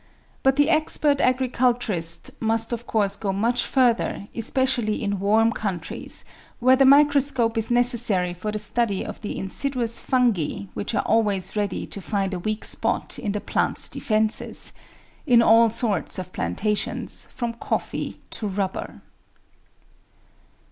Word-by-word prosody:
But 270 0 +3
the 290 +3 +3
expert 305 -2 +2
agriculturist 245 -8 0
must 225 +1 0
of 235 0 -5
course 205 -3 +1
go 200 -3 -2
much 230 +5 +1
further, 240 -5 +1
especially 240 -2 0
in 200 -2 -1
warm 220 +3 +3
countries, 190 -7 -5 0.3
where 255 +2 +5
the 270 +1 +4
microscope 280 -4 +4
is 225 -1 -1
necessary 240 -7 +2
for 185 +5 -4
the 215 - -3
study 210 -1 -1
of 215 - -8
the 210 - -5
insidious 235 +3 -2
Fungi 225 - 0
which 100 - -3
are - - +1
always 205 -4 +1
ready 205 -3 -2
to 200 - -7
find 195 -1 -2
a 180 - -3
weak 215 +4 -2
spot - - 0
in 205 -4 -2
the 210 - -2
plants' - - +1
defences 215 -1 -1 0.3
— - - -30
in 235 -1 +7
all 230 +1 +6
sorts 220 -5 -2
of 185 -1 -7
plantations 205 - -2
from 240 -2 -4
coflFee 230 - -3
to 215 - -4
rubber. 195 -1 -4
225 Hz, 140 wpm, -24 LUFS, 200-245 Hz, 0.3 s, in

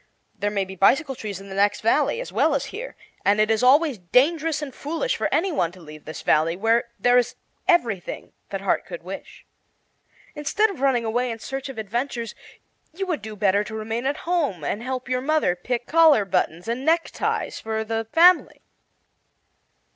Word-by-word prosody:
"There 205 - -2
may 200 -2 -1
be 190 0 -9
bicycle 270 - +3
trees 210 -6 -6
in 195 - -11
the - - -7
next 200 +1 +2
valley, 290 - +2
as - - -6
well - - +3
as - - -1
here; 485 +5 -6 0.3
and 205 +1 +3
it 215 +1 +3
is 220 - +2
always 275 -1 +4
dangerous 300 - +2
and 275 -3 -6
foolish 330 - -2
for - - -2
any 380 +3 +1
one 175 - 0
to 185 - -14
leave 155 -2 -12
this 155 - -7
Valley, 160 +2 +2
where 225 +5 +2
there 245 0 +5
is 245 - -2 0.3
everything 230 - 0 0.2
that - - -4
heart - - +1
could - - -9
wish. - - -9 0.9
Instead 400 +9 +1
of 360 - -10
running 260 -4 +2
away 245 +3 0
in 230 - -4
search 270 +4 -6
of 265 - -8
adventures, 230 +2 -3 0.6
you 385 +2 -2
would 345 - -2
do 215 +1 -7
better 200 0 +2
to 215 - -8
remain 225 +3 -3
at 285 - -1
home 305 - 0
and 205 +9 -2
help 255 0 -4
your 255 0 0
mother 290 - +1
pick 240 +6 -3
collar 315 -9 +5
buttons 175 -1 -1
and 235 +3 -2
neckties 325 +3 0
for 220 0 -3
the 225 0 -3
family." 350 +2 +4
240 Hz, 190 wpm, -23 LUFS, 205-295 Hz, 0.9 s, there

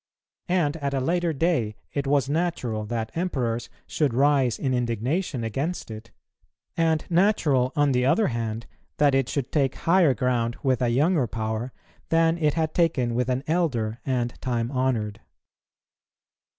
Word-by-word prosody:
And 165 -4 +1
at 140 -2 -2
a - - +1
later 170 +5 0
day 140 -9 0 0.2
it 140 -1 -2
was 140 -2 +2
natural 140 -9 -1
that 110 0 -3
Emperors 125 -10 -2 0.2
should 145 -7 0
rise 135 -3 +3
in 130 -2 -1
indignation 125 - -1
against 135 +6 -3
it; 110 +1 -9 0.7
and 160 -2 +1
natural, 165 -9 +2
on 145 -2 +3
the 125 -1 +2
other 205 - +3
hand, 115 -1 -3 0.3
that 145 -2 +4
it 135 -2 +1
should 140 -4 -3
take 135 -3 +1
higher 165 -2 +3
ground 120 0 0
with 130 -3 +1
a 125 - +2
younger 145 +2 +2
power 110 +2 -3 0.4
than 165 +1 +3
it 150 -2 +1
had 160 -1 0
taken 130 -9 +1
with 125 +1 0
an 130 +1 0
elder 130 -10 0
and 125 -3 -2
time 120 -1 -1
honoured. 125 -6 -1
135 Hz, 150 wpm, -25 LUFS, 120-160 Hz, 0.7 s, that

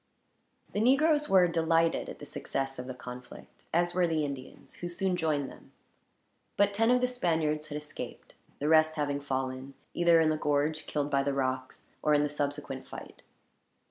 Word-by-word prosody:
The - - 0
negroes 295 +6 +4
were 185 -2 +6
delighted 165 0 +1
at - - -8
the - - -9
success 135 -1 -3
of 125 - -6
the 130 - -5
conflict; 125 0 -11
as 175 +1 +2
were 180 -1 +3
the 160 -2 0
Indians, 135 -2 -7
who 175 - -5
soon 185 +1 0
joined 155 -5 0
them. - - -16 0.8
But 205 0 +4
ten 225 +3 +2
of 250 0 +4
the 250 - +3
Spaniards 160 -10 0
had 150 -1 -4
escaped, 150 0 -8 0.2
the 145 - -2
rest 155 0 +5
having 145 -2 -1
fallen; 130 0 -3 0.2
either 170 -1 +5
in 160 -1 +4
the 155 - 0
gorge, 150 +1 0
killed 145 -1 -2
by 140 -1 +3
the 140 0 0
rocks, 130 -1 -2 0.2
or 150 -1 +3
in 145 - +3
the 150 - 0
subsequent 145 -2 -3
fight. - - -10
155 Hz, 180 wpm, -30 LUFS, 140-175 Hz, 0.8 s, were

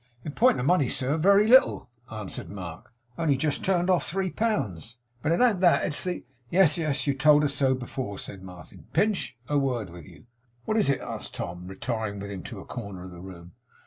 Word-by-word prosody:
'In 150 - -3
point 245 - +3
of 125 - -1
money, 165 -5 +3
sir, 135 +3 0
very 200 +6 +5
little,' 255 +4 +5 0.2
answered 105 -3 -5
Mark. 90 -4 -8 0.3
'Only 150 -5 +2
just 145 +1 -1
turned 180 -2 +1
of 185 -2 +3
three 185 +1 -2
pounds. 120 - -2 0.2
But 150 - 0
it 170 - +2
an't 225 -7 +3
that; 175 -2 +4
it's 150 - -1
the 180 -1 -4
' 120 -1 -37
'Yes, 175 -4 +4
yes, 150 -3 -1
you 140 - +2
told 150 +2 +5
us 145 -2 0
so 135 -2 +2
before,' 125 -4 -5
said 95 0 -7
Martin. 90 -3 -12
'Pinch, 200 - 0
a 145 -1 +2
word 120 -9 -2
with 85 -3 -11
you.' - - -16 0.4
'What 215 - 0
is 210 - +3
it?' 140 - +1
asked - - -7
Tom, 90 +1 -6
retiring 110 0 -4
with 100 +1 -6
him 95 -2 -6
to - - -7
a - - -10
corner 100 -6 -7
of 95 - -9
the 90 0 -11
room. 90 -2 -11
135 Hz, 215 wpm, -27 LUFS, -, 0.4 s, very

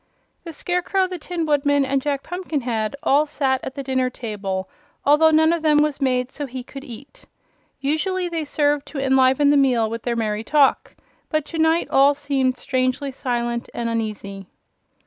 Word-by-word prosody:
The 335 - -7
Scarecrow, 360 +4 0
the 365 -1 -6
Tin 340 0 -3
Woodman 285 -2 +2
and 270 0 0
Jack 280 -1 -2
Pumpkinhead 275 - -3
all 290 +3 +3
sat 270 -3 0
at 265 - -6
the 280 - -5
dinner 260 -1 0
table, 200 -6 -4 0.4
although 300 +3 +5
none 315 +1 +4
of 340 - -2
them 305 -1 +3
was 300 -1 +1
made 255 -1 0
so 290 -2 -5
he 255 0 -7
could 275 +2 -10
eat. 275 +1 -12 0.5
Usually 350 +6 -1
they 335 -2 -3
served 290 -1 0
to 310 - -8
enliven 265 +1 +3
the 290 - +4
meal 250 -5 +3
with 230 0 -4
their 240 0 -2
merry 215 -1 -2
talk, 285 +2 +2 0.3
but 310 -2 0
to 325 - -6
night 320 +1 +2
all 280 +1 +5
seemed 270 -3 0
strangely 255 +2 -1
silent 240 -2 -3
and 235 -1 -2
uneasy. 205 -4 -4
275 Hz, 175 wpm, -22 LUFS, 250-300 Hz, 0.5 s, although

